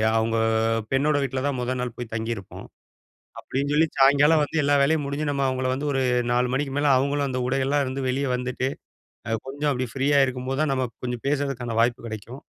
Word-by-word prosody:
அவுங்க 115 0 +1 0.5
பெண்ணோட 145 +3 +2
வீட்ல 130 -1 -2
தான் 140 -2 -1
மொத 125 +1 -1
நாள் 125 -1 -3
போய் 120 -2 -7
தங்கியிருப்போம், 110 -3 -5 0.7
அப்டின்னு 140 +2 -2
சொல்லி, 160 +2 +4
சாயங்காலம் 145 +3 +5
வந்து 155 +2 0
எல்லா 145 0 +3
வேலையும் 150 +1 +2
முடிஞ்சு 145 +2 -2
நம்ம 140 -1 0
அவுங்கள 130 0 -1
வந்து 140 +3 -3
ஒரு 135 -1 +1 0.3
4 125 +1 +2
மணிக்கு 135 0 -2
மேல 145 0 +2
அவுங்களும் 140 +2 +1
அந்த 130 -1 -2
உடைகள்லலாம் 135 +2 +1
இருந்து 130 0 -3
வெளிய 135 +2 0
வந்துட்டு, 125 +1 -2 0.6
அ 115 -1 0
கொஞ்சம் 145 +2 -1
அப்டி 130 0 -2
ஃப்ரீயா 140 +1 +2
இருக்கும்போதுதான் 130 +3 -1
நம்ம 130 -1 0
ப் - - -62
கொஞ்சம் 125 -1 -4
பேசறதுக்கான 135 -5 -1
வாய்ப்பு 120 +1 0
கெடைக்கும். 115 +5 -8
135 Hz, 185 wpm, -24 LUFS, 125-145 Hz, 0.7 s, சாயங்காலம்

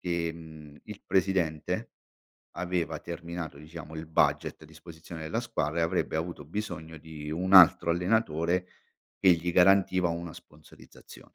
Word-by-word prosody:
che, 85 -2 -1
mhmm, 80 -3 -12
il 105 -1 -10
presidente, 90 -5 0 0.7
aveva 85 -3 -2
terminato, 85 -2 -7
diciamo, 80 +1 -10
il 80 0 -7
budget 80 - +1
a - - -12
disposizione 80 +1 -11
della 80 - -2
squadra 75 +3 -2
e, - - +2
avrebbe 80 -1 -1
avuto 80 -3 -4
bisogno 80 -3 -6
di 75 -1 -9
un 95 +4 0
altro 85 -2 +8
allenatore, 90 -2 0 0.5
che 95 - +5
gli 85 +1 -1
garantiva 95 -1 +4
una 85 -1 -5
sponsorizzazione. 75 0 -16
85 Hz, 140 wpm, -28 LUFS, 80-90 Hz, 0.7 s, altro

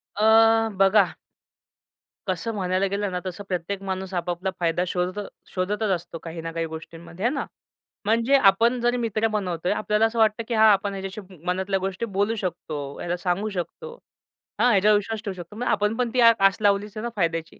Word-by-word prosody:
अ, 225 +1 +5
बघा 195 0 +4 1.2
कसं 185 +5 -1
म्हणायला 185 0 0
गेलं 200 0 -2
ना 180 - -2
तसं 185 +2 -5
प्रत्येक 185 +2 -3
माणूस 190 0 -4
आपापला 175 +1 -2
फायदा 170 +1 +1
शोधत 180 +3 -2 0.3
शोधतच 205 +3 -1
असतो 170 -1 -8
काही 165 0 -6
ना 165 0 -5
काही 165 0 -2
गोष्टींमध्ये 165 +4 -8
आहे 245 - +2
ना. 280 - -2 0.6
म्हणजे 230 +5 +3
आपण 230 +3 +4
जरी 240 +1 +2
मित्र 225 -2 0
बनवतोय 180 -5 -2
आपल्याला 210 +1 +1
असं 225 +1 -1
वाटतं 220 +1 +3
की 240 - -2
हा 220 0 +5
आपण 200 0 +1
ह्याच्याशी 195 +1 -6 0.2
मनातल्या 190 +2 0
गोष्टी 195 +4 -3
बोलू 205 +2 0
शकतो, 155 -7 -5
याला 175 +1 -2
सांगू 190 +4 -1
शकतो. 205 - -6 0.7
हा 245 - +5
ह्याच्यावर 210 0 +5
विश्वास 210 +1 -4
ठेवू 200 - -2
शकतो. 175 +3 -10
मग 245 +2 -3
आपण 210 +2 +1
पण 250 -2 0
ती 250 - +3
आस 210 -4 +5
लावलीच 205 0 +1
आहे 215 - -4
ना 235 - -2
फायद्याची. 165 -3 -2
195 Hz, 180 wpm, -24 LUFS, 180-220 Hz, 1.2 s, अ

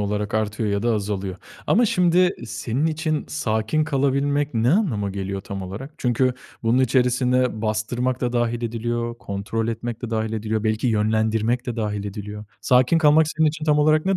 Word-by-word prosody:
olarak 105 0 -2
artıyor 110 0 -1
ya 100 0 0
da 120 0 +2
azalıyor. 100 -3 -3 0.3
Ama 235 +3 +4
şimdi 180 0 +3
senin 120 +6 -2
için 155 -1 -1
sakin 110 - 0
kalabilmek 140 0 0
ne 115 +2 +2
anlama 135 - +1
geliyor 95 0 -4
tam 95 0 -6
olarak? 100 +10 -7
Çünkü 125 +1 +1 0.3
bunun 115 +2 +3
içerisinde 125 -2 +2
bastırmak 120 +4 -1
da 125 -1 -1
dâhil 120 0 0
ediliyor, 120 0 -2
kontrol 110 +3 -3
etmek 115 +1 -4
de 120 - -4
dâhil 110 -1 -1
ediliyor. 110 0 -2
Belki 110 +2 0
yönlendirmek 110 +2 +1
de 120 -2 -3
dâhil 105 -2 -2
ediliyor. 105 +1 -6 0.2
Sakin 125 +6 +4
kalmak 155 0 +5
senin 160 -1 +4
için 155 +1 -4
tam 150 -1 +3
olarak 155 +2 +3
ne 195 0 +2
120 Hz, 170 wpm, -23 LUFS, 110-135 Hz, 0.3 s, kalmak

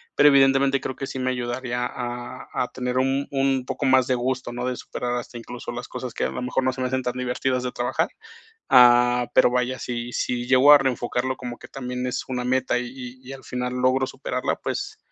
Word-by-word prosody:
Pero, 145 - +7
evidentemente, 135 0 +4
creo 130 - -4
que 135 - -5
sí - - -6
me 130 0 0
ayudaría 125 0 -3
a 120 0 -6
a 125 - 0
tener 125 0 -2
un 135 +2 0
un 135 -2 +1
poco 140 - -3
más 130 -1 +5
de 130 - +2
gusto, 130 0 -2
¿no? 120 +1 -4
De 125 - -1
superar 120 0 -4
hasta, 120 0 -6
incluso, 120 +1 -7
las 120 +1 -6
cosas 125 -3 -6
que, - - -1
a - - -1
lo - - -5
mejor, 125 +1 0
no 130 0 +1
se 130 - -6
me 130 - +1
hacen 130 +1 -1
tan 125 - -1
divertidas 125 0 -1
de 125 - -2
trabajar. 120 0 -1 0.6
Ah, 125 0 +6
pero - - +6
vaya, 125 +1 0
si 120 0 -4
si 120 0 -2
llego 130 +3 +7
a 145 - +10
reenfocarlo, 130 -1 -1
como 120 -1 -7
que - - -12
también 125 -1 -4
es 125 - -3
una 125 -1 -2
meta, 125 0 +1
y 125 +1 -7
y 130 +1 -9
al 135 -1 -10
final 125 0 -3
logro 130 +1 +2
superarla. - - -3
Pues, - - -4
125 Hz, 220 wpm, -24 LUFS, 125-130 Hz, 0.6 s, a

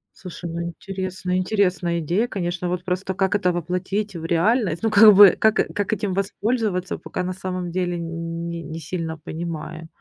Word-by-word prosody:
Слушай, 180 -1 -8
ну 170 - -3
интересно. 185 +1 -4
Интересная 185 -3 +1
идея, 175 +9 0
конечно. 175 -4 -3
Вот 180 0 -2
просто 185 +1 -2
как 190 0 +1
это 180 -3 +2
воплотить 180 +4 -2
в 165 -1 -6
реальность? 175 +1 +1
Ну 225 - +3
как 215 0 +8
бы, 200 -1 +9
как 220 0 +4 0.2
как 205 0 0
этим 205 -3 -2
воспользоваться, 200 -1 -1
пока 180 - -5
на 185 +1 -3
самом 185 -1 -4
деле 175 0 -1
нь 165 -1 -5
не 160 - -5
сильно 165 0 -4
понимаю. 160 0 -6
180 Hz, 170 wpm, -23 LUFS, 170-195 Hz, 0.2 s, бы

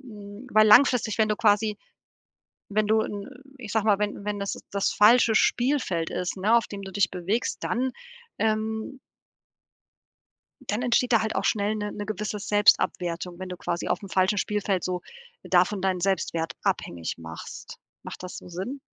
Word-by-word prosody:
hm 210 -1 -11
weil 215 0 +6
langfristig, 230 -1 +5
wenn 215 -1 +3
du 210 - 0
quasi 210 0 +2 0.9
wenn 215 +1 +1
du 220 +1 +3
'n 205 +2 -6 0.3
ich 220 -5 -7
sage 220 -2 +1
mal, 205 -2 +4
wenn 205 -1 -3
wenn 210 -1 -2
das 200 - -3
das 200 0 0
falsche 225 +1 +5
Spielfeld 240 - +1
ist, 180 +1 -3
ne, 215 +5 +3
auf 230 - +2
dem 200 -1 -7
du 195 -1 -8
dich 190 -1 +1
bewegst, 190 +6 -2
dann 255 +2 -1 0.5
ähm 220 +4 -1 1.7
dann 215 +4 -1
entsteht 245 0 +2
da 225 - +5
halt 220 - -2
auch - - -1
schnell 210 0 +1
'ne 210 -1 -3
'ne 205 0 -6
gewisse 210 0 -3
Selbstabwertung, 180 -4 +1
wenn 185 0 -6
du 180 - -6
quasi 175 0 -3
aufm 200 - -2
falschen 190 +2 +1
Spielfeld 200 -3 -1
so 180 -1 -2 0.4
davon 185 +2 +2
deinen 190 -2 0
Selbstwert 170 -3 -1
abhängig 85 -2 -2
machst. 80 0 -9 0.2
Macht - - -8
das 180 - -7
so - - -11
Sinn? 195 +11 -5
205 Hz, 170 wpm, -26 LUFS, 185-220 Hz, 1.7 s, weil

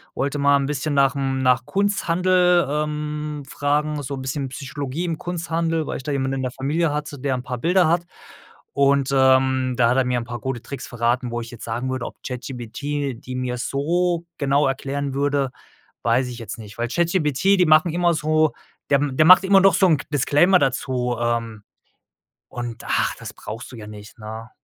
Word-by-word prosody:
wollte 140 +1 -1
mal 140 0 +4
'n 140 - -1
bisschen 145 +1 -2
nach 135 -1 +4
dem 135 -1 -1
nach 125 -1 +3
Kunsthandel, 180 -3 +2
ähm, 150 0 -3
fragen, 150 +1 -1
so 140 0 -5
'n 135 - -6
bisschen 135 0 -3
Psychologie 140 +4 -5
im 165 -2 -3
Kunsthandel, 165 -2 -2
weil - - -4
ich - - -9
da 145 - -3
jemanden 135 -1 -1
in - - -2
der 130 - -2
Familie 145 +5 0
hatte, 150 -1 -4
der 135 -1 -1
'n 125 - -5
paar 125 -1 -5
Bilder 175 +4 +3
hat 170 +1 +1 0.7
und, 140 -1 +3
ähm, 130 -1 +3
da 120 -2 +4
hat 130 - +1
er 130 - +4
mir 125 -1 0
'n 120 - -5
paar 120 0 -6
gute 120 0 -4
Tricks 140 - -7
verraten, 120 +1 0
wo 120 0 -2
ich 115 - -9
jetzt 120 - -10
sagen 120 +3 -3
würde, 130 -2 -3
ob - - -10
ChatGPT, 130 +2 -4
die 130 0 -7
mir 125 -1 -2
so 170 +6 0
genau 140 0 +2
erklären 140 +1 -3
würde, 140 -1 0 0.5
weiß 120 +2 +2
ich 120 - -8
jetzt 115 -2 -7
nicht, 105 -2 -11
weil 120 - 0
ChatGPT, 170 +3 +2
die 180 - +4
machen 155 +2 +5
immer 175 -1 +2
so 155 0 +2 0.4
der 140 - +5
der 145 +1 +2
macht 185 +3 +9
immer 195 0 +5
doch 195 0 +5
so 190 0 +4
'n 155 -5 +3
Disclaimer 150 +7 +4
dazu, 125 -3 -1
ähm, 115 -2 -2 0.9
und, 120 -1 -6
ah, - - +1
das - - -8
brauchst 115 +3 -8
du - - -8
ja 105 -1 -9
nicht, 105 +1 -11
ne? 110 +1 -8
140 Hz, 195 wpm, -22 LUFS, 125-155 Hz, 0.9 s, macht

